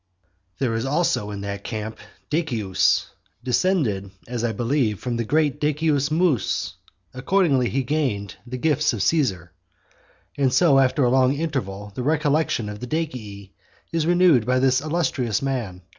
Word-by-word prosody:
XIII. 90 0 -46
There 115 - 0
is 115 +3 -2
also 145 -8 0
in 100 -1 -6
that 100 0 -5
camp 110 -1 -5 0.3
Decius, 120 - +1 0.4
descended, 125 - 0 0.2
as 120 -1 -3
I 120 - +1
believe, 115 -2 0
from 125 -2 -3
the 115 - -1
great 145 +4 +1
Decius 150 -1 +1
Mus; 155 - 0 0.4
accordingly 135 -2 +2
he 135 0 -1
gained 125 -9 -2
the 125 +1 -5
gifts 150 0 +1
of 105 -5 -1
Caesar. 95 - 0 0.9
And 135 -2 +3
so 145 -2 +5
after 135 +1 +2
a 120 - +3
long 130 +1 +3
interval 105 -11 -4
the 125 - -4
recollection 150 -4 +1
of 105 0 -6
the 125 - -6
Decii 110 -11 -4 0.4
is 165 -1 0
renewed 175 -8 +5
by 125 +3 +1
this 130 0 +3
illustrious 145 - -1
man. 115 -10 -3
130 Hz, 155 wpm, -23 LUFS, 105-150 Hz, 0.9 s, so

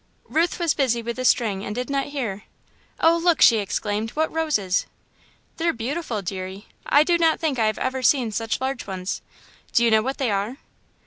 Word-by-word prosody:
Ruth 335 +2 +1
was 340 -4 +1
busy 240 -5 0
with 235 0 -3
the 255 - -3
string 205 -6 +2
and 210 - -5
did 250 +1 -3
not 275 -1 -1
hear. 235 -9 -4 0.6
"Oh, 330 +1 +5
look!" 340 -1 +2
she 230 - +7
exclaimed, 210 +2 -2
"what 315 +1 0
roses!" 250 - 0 0.7
"They're 335 0 +1
beautiful, 240 -2 -3
deary. 190 +2 -6 0.2
I 290 - +5
do 340 +1 +2
not 325 -1 +3
think 300 -6 -1
I 220 - +3
have 215 - -1
ever 260 0 -2
seen 250 -2 +3
such 225 +1 -2
large 265 -2 -3
ones. 185 -1 -4 0.5
Do 235 - +4
you 230 - +3
know 220 0 +5
what 265 +4 -3
they 255 -5 0
are?" 205 +6 -2
245 Hz, 195 wpm, -23 LUFS, 210-295 Hz, 0.7 s, she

